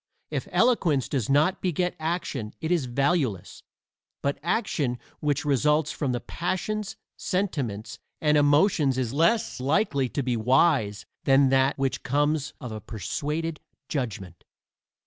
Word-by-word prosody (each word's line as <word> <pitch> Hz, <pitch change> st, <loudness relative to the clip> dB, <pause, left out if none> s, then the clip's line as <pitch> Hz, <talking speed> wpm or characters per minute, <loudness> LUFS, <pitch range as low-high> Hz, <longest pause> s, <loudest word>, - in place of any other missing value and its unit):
If -, -, -3 dB
eloquence 175 Hz, -, +2 dB
does 130 Hz, -7 st, -2 dB
not 150 Hz, +6 st, +3 dB
beget 180 Hz, 0 st, 0 dB
action 155 Hz, -9 st, -3 dB
it 160 Hz, +1 st, -3 dB
is 170 Hz, -6 st, +2 dB
valueless; 130 Hz, -, -1 dB, 0.6 s
but 140 Hz, 0 st, -1 dB
action 155 Hz, -, 0 dB, 0.2 s
which 150 Hz, +1 st, 0 dB
results 150 Hz, +2 st, +2 dB
from 140 Hz, -4 st, -2 dB
the 120 Hz, -, -1 dB
passions, 195 Hz, -, -3 dB, 0.2 s
sentiments 140 Hz, -, -2 dB, 0.2 s
and 150 Hz, -1 st, +3 dB
emotions 145 Hz, -1 st, +3 dB
is 125 Hz, -2 st, -1 dB
less 170 Hz, -, +2 dB
likely 140 Hz, -, +1 dB
to 140 Hz, -, -2 dB
be 125 Hz, -1 st, 0 dB
wise 115 Hz, -3 st, +2 dB, 0.2 s
than 135 Hz, 0 st, +5 dB
that 135 Hz, +1 st, +3 dB
which 135 Hz, -1 st, -1 dB
comes 145 Hz, +2 st, 0 dB
of 125 Hz, -, -7 dB
a 110 Hz, 0 st, -6 dB
persuaded 150 Hz, -, -3 dB, 0.3 s
judgment. 100 Hz, -, -4 dB
145 Hz, 130 wpm, -26 LUFS, 125-165 Hz, 0.6 s, than